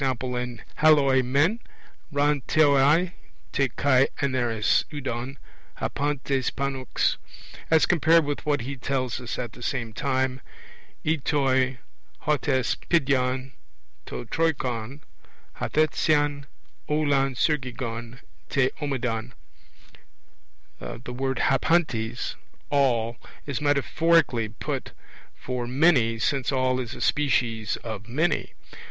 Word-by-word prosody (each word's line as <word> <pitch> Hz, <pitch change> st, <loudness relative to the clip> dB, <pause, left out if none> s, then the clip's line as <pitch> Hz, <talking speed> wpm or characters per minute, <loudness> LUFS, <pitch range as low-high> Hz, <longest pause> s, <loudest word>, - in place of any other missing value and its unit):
in 125 Hz, -2 st, -2 dB
halloi 145 Hz, -4 st, +5 dB
men 145 Hz, -, +2 dB, 0.5 s
ra 145 Hz, +1 st, +3 dB
theoi 155 Hz, +4 st, +4 dB, 0.4 s
te 135 Hz, -2 st, +1 dB
kai 135 Hz, +1 st, +3 dB
aneres 120 Hz, -6 st, +1 dB
eudon 135 Hz, -2 st, -4 dB, 0.4 s
(hapantes) 140 Hz, -2 st, -1 dB
pannux 135 Hz, -2 st, -1 dB, 0.5 s
as 160 Hz, -1 st, +5 dB
compared 165 Hz, -1 st, +4 dB
with 145 Hz, 0 st, -3 dB
what 145 Hz, -3 st, +1 dB
he 135 Hz, +4 st, -5 dB
tells 130 Hz, -1 st, -2 dB
us 120 Hz, -, -5 dB
at 120 Hz, -3 st, -4 dB
the 120 Hz, -, -14 dB
same 120 Hz, -3 st, -3 dB
time, 130 Hz, 0 st, -1 dB, 0.6 s
e 160 Hz, +1 st, +2 dB
toi 130 Hz, -3 st, +1 dB, 0.4 s
hot 150 Hz, -1 st, 0 dB
hes 130 Hz, -3 st, +2 dB, 0.2 s
pedion 130 Hz, -4 st, +1 dB, 0.6 s
to -, -, -6 dB
Troikon 130 Hz, -3 st, -1 dB, 0.6 s
hathreseien, 145 Hz, -2 st, +1 dB, 0.4 s
aulon 140 Hz, -3 st, +2 dB
suriggon 125 Hz, -4 st, -2 dB, 0.3 s
*te 135 Hz, -3 st, +2 dB
homadon* 125 Hz, -4 st, -2 dB, 1.5 s
the 125 Hz, +1 st, -7 dB
word 130 Hz, 0 st, -2 dB
hapantes 130 Hz, -5 st, +1 dB, 0.4 s
'all', 120 Hz, -5 st, +2 dB, 0.3 s
is 140 Hz, 0 st, -3 dB
metaphorically 145 Hz, -4 st, +2 dB
put 110 Hz, -, -5 dB, 0.4 s
for 125 Hz, -1 st, -4 dB
'many', 125 Hz, -4 st, +3 dB
since 135 Hz, +3 st, 0 dB
'all' 130 Hz, -1 st, +1 dB
is 120 Hz, -3 st, -5 dB
a 120 Hz, -, -9 dB
species 120 Hz, -7 st, +1 dB
of 110 Hz, -2 st, -6 dB
'many 155 Hz, +7 st, 0 dB
135 Hz, 105 wpm, -25 LUFS, 125-145 Hz, 1.5 s, halloi